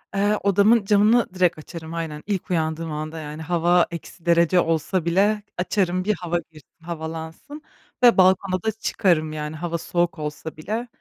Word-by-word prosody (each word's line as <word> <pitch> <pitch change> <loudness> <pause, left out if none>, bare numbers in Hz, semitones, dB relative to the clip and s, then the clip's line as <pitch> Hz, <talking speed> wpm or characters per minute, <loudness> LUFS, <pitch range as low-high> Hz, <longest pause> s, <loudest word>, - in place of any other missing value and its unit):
Eee, 205 +1 +2
odamın 200 +2 +4
camını 210 +1 +3
direkt 180 -3 +2
açarım, 160 +1 -9
aynen. 160 -3 -5
İlk 195 -3 -2
uyandığım 160 -1 -1
anda, 155 +2 -5
yani, 150 +1 -7
hava 175 +1 +2
eksi 170 +1 -9
derece 170 +1 +4
olsa 165 +2 0
bile 205 +4 +2
açarım 185 -1 0
bir 210 0 +1
hava 175 -1 -1
girsin, 155 -4 -16 0.2
havalansın 165 - -7 0.4
ve 240 -4 +7
balkona 185 0 +3
da 220 - +1
çıkarım, 170 -7 0
yani, 150 0 -5
hava 170 +1 -3
soğuk 175 0 -1
olsa 150 +1 -6
bile. 220 +9 -4
175 Hz, 160 wpm, -23 LUFS, 160-195 Hz, 0.4 s, ve